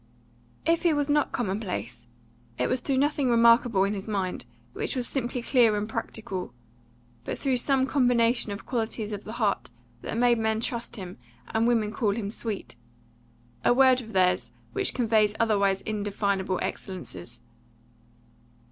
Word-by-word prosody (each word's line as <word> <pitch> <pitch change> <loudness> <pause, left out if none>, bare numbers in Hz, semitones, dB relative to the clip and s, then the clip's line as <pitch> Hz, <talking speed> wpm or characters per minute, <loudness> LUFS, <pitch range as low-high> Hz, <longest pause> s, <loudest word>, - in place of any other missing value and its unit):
If 330 +1 +3
he 340 -3 +3
was 290 0 0
not 295 0 +2
commonplace, 190 - -3 0.5
it 125 - +1
was 255 - 0
through 270 +1 -1
nothing 285 -1 +2
remarkable 230 -3 +5
in 200 +1 0
his 195 0 -6
mind, 190 - -2 0.3
which - - -3
was 250 -2 -2
simply 245 -2 -2
clear 235 -5 +4
and 205 +1 -2
practical, 195 - -5 0.7
but - - -4
through 265 -2 0
some 265 +1 +2
combination 245 -4 +2
of 200 - -6
qualities 220 -3 -2
of 205 0 -6
the 215 - -6
heart 215 -4 0 0.3
that - - -4
made 240 -1 +4
men 220 0 +1
trust 235 0 -4
him, 185 - -8 0.3
and 225 +1 +2
women 225 -3 +2
call 210 -2 0
him 205 -3 -3
sweet 220 -2 -4 0.9
a 245 - +4
word 260 -1 +5
of 225 -2 -11
theirs 180 -1 +2 0.2
which 395 -1 0
conveys 220 -3 +2
otherwise 200 -4 +2
indefinable 200 -3 -1
excellences. 180 - -6
225 Hz, 150 wpm, -27 LUFS, 200-245 Hz, 0.9 s, remarkable